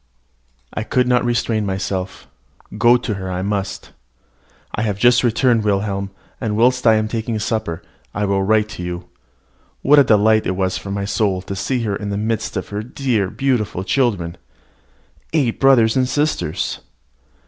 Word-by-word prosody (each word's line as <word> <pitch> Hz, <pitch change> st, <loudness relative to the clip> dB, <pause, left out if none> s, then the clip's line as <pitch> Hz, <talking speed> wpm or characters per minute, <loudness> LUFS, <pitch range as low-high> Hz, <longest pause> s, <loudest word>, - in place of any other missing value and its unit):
I -, -, -3 dB
could 125 Hz, +3 st, +1 dB
not 125 Hz, 0 st, +3 dB
restrain 120 Hz, -2 st, 0 dB
myself 95 Hz, -1 st, -4 dB, 0.5 s
go 120 Hz, +1 st, +5 dB
to 115 Hz, -, -3 dB
her 95 Hz, -2 st, -5 dB
I 90 Hz, 0 st, -2 dB
must. 100 Hz, -1 st, -3 dB, 0.8 s
I -, -, -2 dB
have 105 Hz, -3 st, -1 dB
just 120 Hz, +3 st, +4 dB
returned, 120 Hz, -1 st, +2 dB
Wilhelm; 100 Hz, -1 st, -1 dB, 0.3 s
and 105 Hz, -4 st, -1 dB
whilst 125 Hz, +1 st, +3 dB
I 110 Hz, -, +7 dB
am 110 Hz, 0 st, +1 dB
taking 115 Hz, 0 st, -3 dB
supper 110 Hz, -6 st, -2 dB, 0.3 s
I 105 Hz, +1 st, -1 dB
will 100 Hz, -1 st, +1 dB
write 110 Hz, +2 st, +2 dB
to 105 Hz, -4 st, -8 dB
you. 90 Hz, 0 st, -6 dB, 0.7 s
What 145 Hz, +2 st, +6 dB
a -, -, +7 dB
delight 110 Hz, -1 st, +3 dB
it 95 Hz, -, -1 dB
was 95 Hz, 0 st, 0 dB
for 100 Hz, -, -6 dB
my 100 Hz, 0 st, -2 dB
soul 100 Hz, -3 st, 0 dB
to 100 Hz, -, -5 dB
see 115 Hz, +6 st, -1 dB
her 105 Hz, -3 st, -1 dB
in 100 Hz, 0 st, -5 dB
the 100 Hz, -, -2 dB
midst 110 Hz, 0 st, -2 dB
of 95 Hz, -, -4 dB
her 105 Hz, 0 st, -3 dB
dear, 115 Hz, -4 st, -1 dB
beautiful 120 Hz, -7 st, -1 dB
children, 100 Hz, -8 st, 0 dB, 1.0 s
eight 135 Hz, -8 st, +1 dB
brothers 125 Hz, -5 st, +5 dB
and 130 Hz, -1 st, +2 dB
sisters! 145 Hz, -, -1 dB
110 Hz, 170 wpm, -19 LUFS, 100-120 Hz, 1.0 s, I